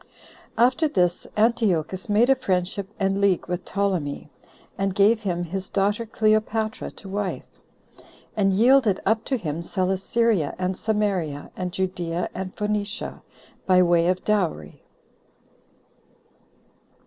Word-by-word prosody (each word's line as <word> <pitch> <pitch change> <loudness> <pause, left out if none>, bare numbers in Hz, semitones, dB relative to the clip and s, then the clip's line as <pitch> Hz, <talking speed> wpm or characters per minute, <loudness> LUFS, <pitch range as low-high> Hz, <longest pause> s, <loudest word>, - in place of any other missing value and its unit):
1. 235 - +5
After 315 +5 0
this 180 - 0
Antiochus 195 -6 +1
made 225 +5 +4
a - - +6
friendship 190 -3 -2
and 195 0 0
league 195 -3 +2
with 180 +1 -3
Ptolemy, 180 -8 -2 0.4
and 195 -1 -1
gave 210 +3 +4
him 180 -5 -2
his 190 +2 -5
daughter 205 +3 0
Cleopatra 215 0 0
to 200 - -13
wife, 200 0 -3 0.9
and 195 -2 +2
yielded 225 0 +4
up 220 +2 +2
to 265 - 0
him 165 -6 -4
Celesyria, 190 0 0
and 185 0 -1
Samaria, 195 -9 -1
and 180 -1 -3
Judea, 180 -2 -2
and 185 0 -6
Phoenicia, 210 +1 -3 0.5
by 185 -1 +6
way 170 -1 +3
of 185 0 0
dowry. 175 - -1
195 Hz, 125 wpm, -24 LUFS, 180-215 Hz, 0.9 s, a